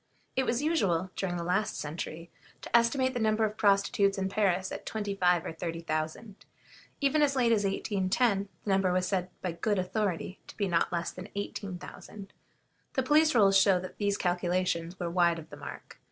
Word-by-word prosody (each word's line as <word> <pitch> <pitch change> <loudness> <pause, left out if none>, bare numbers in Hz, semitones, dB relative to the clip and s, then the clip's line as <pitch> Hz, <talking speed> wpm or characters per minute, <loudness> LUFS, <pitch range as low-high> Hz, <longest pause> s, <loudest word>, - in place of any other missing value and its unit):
It 265 0 +1
was 240 +4 0
usual, 190 - +1
during 180 -2 -2
the 170 - -3
last 195 +5 0
century, 165 +2 -6 0.3
to - - -2
estimate 260 +3 +3
the 245 - -2
number 220 0 +2
of 210 0 -3
prostitutes 200 0 +3
in 190 0 -1
Paris 190 -2 +1
at - - -6
twenty 205 -2 -3
five 180 -3 +2
or - - -4
thirty 165 0 -4
thousand. 160 +6 -4 0.6
Even 280 +2 +3
as 280 -2 +3
late 245 -3 +3
as 210 -3 +2
1810, 200 +1 0
the - - -5
number 190 -1 +3
was 180 0 +1
said 185 -2 -1
by 180 - -1
good 200 +5 -1
authority 185 -1 -2
to - - -12
be 200 - 0
not 170 -2 +1
less 170 -1 -2
than 185 +3 -9
eighteen 200 -2 -4
thousand. 195 +2 -11 0.6
The 265 - +1
police 305 +2 +4
rolls 200 -4 +5
show 195 -1 +5
that 185 0 -9
these 200 -1 +1
calculations 175 -1 -1
were 175 - -2
wide 170 -1 +2
of 160 - -10
the - - -9
mark. - - -10
195 Hz, 195 wpm, -29 LUFS, 180-215 Hz, 0.6 s, rolls